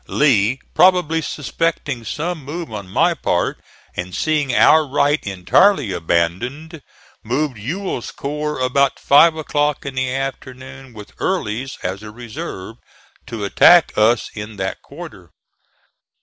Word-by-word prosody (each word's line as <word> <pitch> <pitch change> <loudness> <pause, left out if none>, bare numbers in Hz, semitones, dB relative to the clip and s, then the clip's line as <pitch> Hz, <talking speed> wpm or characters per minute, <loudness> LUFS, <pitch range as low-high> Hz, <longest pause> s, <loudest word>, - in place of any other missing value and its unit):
Lee, 130 -4 +2
probably 180 -3 +4
suspecting 145 -4 -3
some 160 +7 -4
move 155 -1 -6
on 100 -3 -7
my - - +2
part, - - -1 0.4
and 90 0 -5
seeing 150 -4 0
our 155 +5 +5
right 145 +1 +1
entirely 105 - +3
abandoned, 120 - -2 0.4
moved 125 +1 -2
Ewell's 155 - -4
corps 150 +1 -4
about 130 +2 +1
five 160 +3 +5
o'clock 150 -2 -1
in 140 - -4
the 130 -1 -1
afternoon, 130 -1 -6
with 105 -1 -11
Early's 135 - -2
as 95 +2 -3
a 105 - -9
reserve, 110 -2 -8 0.5
to 110 -3 -5
attack 175 - +5
us 110 +2 +2
in 105 0 -7
that 95 -1 -4
quarter. - - -11
135 Hz, 125 wpm, -19 LUFS, 110-150 Hz, 0.5 s, our